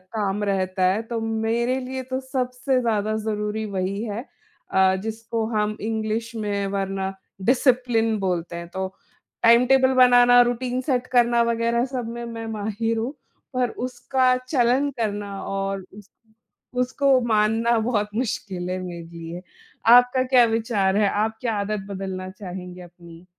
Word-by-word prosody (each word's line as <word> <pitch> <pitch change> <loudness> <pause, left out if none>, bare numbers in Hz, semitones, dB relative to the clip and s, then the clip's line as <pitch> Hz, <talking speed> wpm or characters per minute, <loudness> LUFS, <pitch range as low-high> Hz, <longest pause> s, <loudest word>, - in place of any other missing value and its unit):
काम 205 -1 -1
रहता 190 -2 0
है। 210 - -1
तो 230 0 -4
मेरे 225 +3 0
लिए 260 +1 -5
तो 260 - 0
सबसे 255 0 -1
ज़्यादा 215 -2 0
ज़रूरी 215 0 -2
वही 195 +2 -2
है। 215 0 -4 0.5
अ, 190 0 +4
जिसको 225 +1 -3
हम 210 0 0
इंग्लिश 220 +1 -2
में 205 -2 -2
वरना 195 0 -2 0.4
डिसिप्लिन 245 -4 +2
बोलते 180 -3 -2
हैं 170 0 -6
तो, 190 +2 -3 0.6
टाइम 235 +2 +6
टेबल 265 0 +4
बनाना, 245 -1 +7
रूटीन 245 +1 0
सेट 255 -2 -1
करना 240 -1 +4
वगैरह 235 +1 +1
सब 255 -3 -4
में 235 0 -6
मैं 230 -1 -6
माहिर 220 +2 -2
हूँ, 235 +5 -2 0.4
पर 250 -1 +1 0.2
उसका 255 0 +1
चलन 255 +1 +1
करना 205 -2 -3
और, 195 -1 -3
उस 205 0 -14 0.7
उसको 260 +1 +3
मानना 225 +2 +2
बहुत 215 -2 0
मुश्किल 200 -6 -3
है 185 - -2
मेरे 175 -2 -6
लिए। 170 +1 -8 0.5
आपका 245 +1 +6
क्या 255 -2 +5
विचार 225 -4 0
है? 205 -1 +3
आप 220 +2 -1
क्या 230 -3 -1
आदत 200 -1 -3
बदलना 190 -1 -5
चाहेंगे 180 -2 -8
अपनी, 170 -1 -14
220 Hz, 145 wpm, -23 LUFS, 195-245 Hz, 0.7 s, बनाना